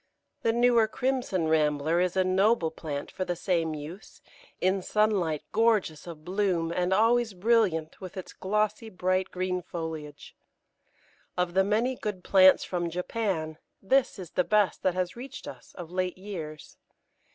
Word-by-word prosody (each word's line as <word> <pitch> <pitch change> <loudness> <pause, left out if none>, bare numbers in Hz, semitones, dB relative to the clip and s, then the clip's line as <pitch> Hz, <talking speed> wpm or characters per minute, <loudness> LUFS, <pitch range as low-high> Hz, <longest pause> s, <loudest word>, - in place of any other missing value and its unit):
The 225 - +2
newer 235 -1 +4
Crimson 245 -8 -1
Rambler 155 +1 +2
is 180 +1 0
a 190 - +4
noble 185 -1 +2
plant 145 -3 -5
for 185 - -3
the 175 -1 -2
same 165 -3 0
use, 155 +7 -9 0.4
in 190 +1 +1
sunlight 190 -7 +1
gorgeous 210 -9 +1
of 160 -2 -9
bloom, 180 -3 0
and 180 0 0
always 225 +1 +3
brilliant 185 -6 +1
with 185 0 -8
its 185 - -7
glossy 215 +3 -1
bright 185 0 0
green 185 0 -2
foliage. 160 -4 -7 1.0
Of 180 -1 0
the 190 +1 +4
many 220 +6 +1
good 205 -6 -5
plants 190 -1 +6
from 175 -2 -2
Japan, 180 -3 -2 0.2
this 260 +6 +2
is 180 -4 -8
the 180 - +1
best 210 -1 +2
that 185 -1 +1
has 180 -1 -2
reached 260 +3 -9
us - - -10
of 175 -2 -8
late 185 0 -2
years. 165 -6 -8
185 Hz, 150 wpm, -28 LUFS, 165-210 Hz, 1.0 s, plants